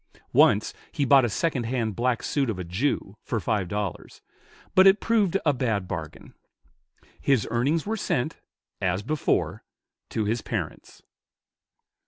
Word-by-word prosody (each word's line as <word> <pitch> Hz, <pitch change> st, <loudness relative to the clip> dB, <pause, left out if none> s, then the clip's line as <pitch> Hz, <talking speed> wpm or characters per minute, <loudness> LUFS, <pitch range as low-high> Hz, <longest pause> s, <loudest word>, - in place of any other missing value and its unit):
Once -, -, +4 dB, 0.2 s
he 140 Hz, -, 0 dB
bought 135 Hz, 0 st, +6 dB
a -, -, 0 dB
second 135 Hz, +3 st, -1 dB
hand 115 Hz, -3 st, -1 dB
black 120 Hz, 0 st, 0 dB
suit 140 Hz, -4 st, 0 dB
of 110 Hz, -, -2 dB
a 90 Hz, -, -4 dB
Jew, 100 Hz, +3 st, -2 dB
for 115 Hz, -, -2 dB
five 105 Hz, -3 st, -1 dB
dollars, 105 Hz, -2 st, -5 dB, 0.5 s
but 190 Hz, +1 st, +7 dB
it 195 Hz, +2 st, +6 dB
proved 210 Hz, -5 st, +2 dB
a 145 Hz, -, +4 dB
bad 115 Hz, -7 st, -1 dB
bargain. 80 Hz, -4 st, -7 dB, 0.9 s
His 135 Hz, -7 st, +2 dB
earnings 140 Hz, +7 st, +1 dB
were 220 Hz, +2 st, -2 dB
sent, 155 Hz, -, -1 dB, 0.4 s
as 90 Hz, +2 st, 0 dB
before, 150 Hz, +5 st, -1 dB, 0.5 s
to 110 Hz, -, -1 dB
his 110 Hz, +2 st, 0 dB
parents. -, -, -5 dB
120 Hz, 145 wpm, -26 LUFS, 105-145 Hz, 0.9 s, but